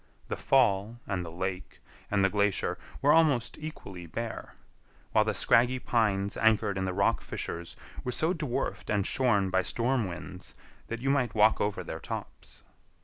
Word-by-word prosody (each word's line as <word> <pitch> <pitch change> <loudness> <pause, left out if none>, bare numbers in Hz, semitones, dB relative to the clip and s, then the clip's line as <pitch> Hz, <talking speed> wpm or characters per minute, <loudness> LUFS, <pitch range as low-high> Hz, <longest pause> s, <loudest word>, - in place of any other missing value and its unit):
The - - -1
fall 115 -3 +2
and 95 -3 -2
the 85 - -7
lake 90 +2 -5 0.3
and 100 -1 +3
the - - +3
glacier 100 -3 +1 0.2
were 145 - +6
almost 150 -7 +3
equally 100 - -8
bare; 115 +7 -6 0.6
while 110 - +4
the 110 -1 -1
scraggy 120 +6 +4
pines 105 -5 0
anchored 110 -3 +3
in 95 0 -1
the 95 - -1
rock 100 +1 +2
fissures 85 0 -5 0.3
were 125 - -2
so 160 +8 +1
dwarfed 150 -8 -3
and 100 -2 +1
shorn 105 -7 +2
by 95 0 +3
storm 120 +2 0
winds 90 +1 -8 0.3
that 115 +1 -5
you 135 +1 +1
might 135 -5 +1
walk 110 +1 +4
over 105 -1 -1
their - - -6
tops. - - -8
105 Hz, 165 wpm, -29 LUFS, 95-125 Hz, 0.6 s, were